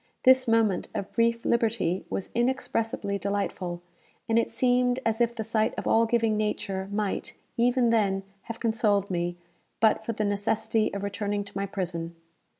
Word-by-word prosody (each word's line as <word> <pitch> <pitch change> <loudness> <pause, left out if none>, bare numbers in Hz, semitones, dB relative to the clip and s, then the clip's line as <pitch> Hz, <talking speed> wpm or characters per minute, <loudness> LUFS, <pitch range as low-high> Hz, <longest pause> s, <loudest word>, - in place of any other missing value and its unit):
This 260 0 +6
moment 225 -4 +2
of 195 - -4
brief 230 0 +1
liberty 225 -6 +1
was 195 - -4
inexpressibly 230 -4 -1
delightful, 190 -3 -3 0.4
and 225 0 +3
it - - 0
seemed 245 +1 +2
as 225 +1 +1
if 235 0 +2
the 220 - -3
sight 220 0 0
of - - -4
all 230 +1 +4
giving 225 -2 +2
Nature 195 -2 -2
might, 205 -1 -2 0.2
even 245 0 +3
then, 195 -4 +2 0.2
have 230 - -6
consoled 210 -4 +1
me, 175 0 -1 0.4
but 220 0 +3
for 230 - -3
the 215 0 -1
necessity 215 +2 0
of 200 - -4
returning 205 0 -2
to 200 - -15
my 200 0 -1
prison. 170 -3 -4
220 Hz, 160 wpm, -27 LUFS, 200-230 Hz, 0.4 s, This